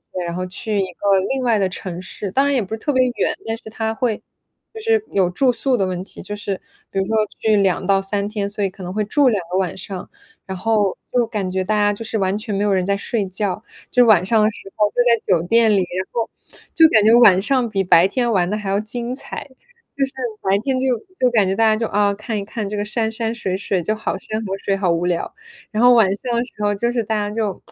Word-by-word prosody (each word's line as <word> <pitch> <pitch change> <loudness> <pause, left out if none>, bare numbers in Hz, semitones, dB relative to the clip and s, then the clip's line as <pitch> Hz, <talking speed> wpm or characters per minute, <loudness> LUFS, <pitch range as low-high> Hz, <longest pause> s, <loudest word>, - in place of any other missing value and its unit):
学， 180 - -2
然 170 - -4
后 185 +1 -3
去 205 +3 -3
一 195 - +1
个 195 +2 +2
另 265 -1 -1
外 230 -4 +2
的 195 - +2
城 180 -1 -5
市， 190 +1 -6
当 270 +7 +2
然 285 0 +2
也 255 - +2
不 205 +1 -6
是 220 - -4
特 290 - -1
别 255 -1 +4
远， - - +1
但 225 - -2
是 220 - -11
它 220 0 -2
会 230 -2 -1 0.5
就 445 - -8
是 445 -1 +1
有 190 -3 +2
住 250 +9 +2
宿 250 +2 +1
的 195 - +1
问 180 -1 -3
题， - - -10
就 205 - -5
是 205 -1 -3 0.3
比 - - -7
如 190 - +1
说 220 - -3 0.3
去 215 -1 +2
2 195 -1 +1
到 195 0 +3
3 200 +1 -1
天， 205 -2 -2
所 205 0 -3
以 195 - +1
可 195 +1 -14
能 180 0 -5
会 215 +1 0
住 280 +6 +2
2 215 -4 +1
个 185 - 0
晚 185 -2 -1
上， 190 -1 -7 0.4
然 190 -1 -5
后 210 -1 +1
就 245 -2 +2
感 205 -5 -3
觉 190 0 -1
大 215 +3 +1
家 205 0 +3
就 205 - -7
是 220 - -2
完 190 -1 0
全 215 -1 -4
没 200 - 0
有 205 - +1
人 185 -1 +1
在 200 +1 +1
睡 210 +1 -2
觉， 190 +1 -2 0.3
就 250 -1 +5
晚 200 -6 +5
上 220 +2 +3
的 210 - +4
时 195 -2 -6
候 210 -1 +2
就 - - -28
在 235 -2 +3 0.2
酒 165 - -4
店 230 +3 +4
里， 210 - +4
然 185 0 -2
后 230 -1 -1 0.4
就 325 - +7
感 220 -8 +5
觉 220 +2 +5
晚 230 -6 +7
上 255 +3 +1
比 195 -3 0
白 175 -1 +5
天 240 +3 0
玩 180 -4 +1
得 210 - -1
还 210 -2 -5
要 195 +1 +1
精 235 +3 -3
彩， 275 - -7 0.5
就 275 - +2
是 270 - -4 0.3
白 195 +1 +2
天 265 -1 0
就 265 - 0 0.3
就 255 - +4
感 215 -4 +4
觉 190 - +1
大 225 - +2
家 220 -1 +4
就， 225 +1 -1
啊， 205 0 +2
看 215 +2 -4
一 - - -4
看 210 0 -4
这 210 - -4
个 205 - -1
山 220 +1 -1
山 225 0 -2
水 190 -6 -2
水， 195 -2 -1
就 215 - 0
好 215 - -3
山 215 +3 -4
河 195 0 -3
水， 195 0 -1
好 195 -2 0
无 170 +1 +1
聊， 175 - -2 0.4
然 220 +2 0
后 245 0 +7
晚 225 -4 +6
上 240 +4 -4
的 235 - +1
时 245 - -11
候 205 0 +2
就 235 +4 -1
是 240 -1 -1
大 220 +1 -2
家 205 -1 -1
就 215 -4 -2
210 Hz, 290 characters per minute, -20 LUFS, 195-230 Hz, 0.5 s, 就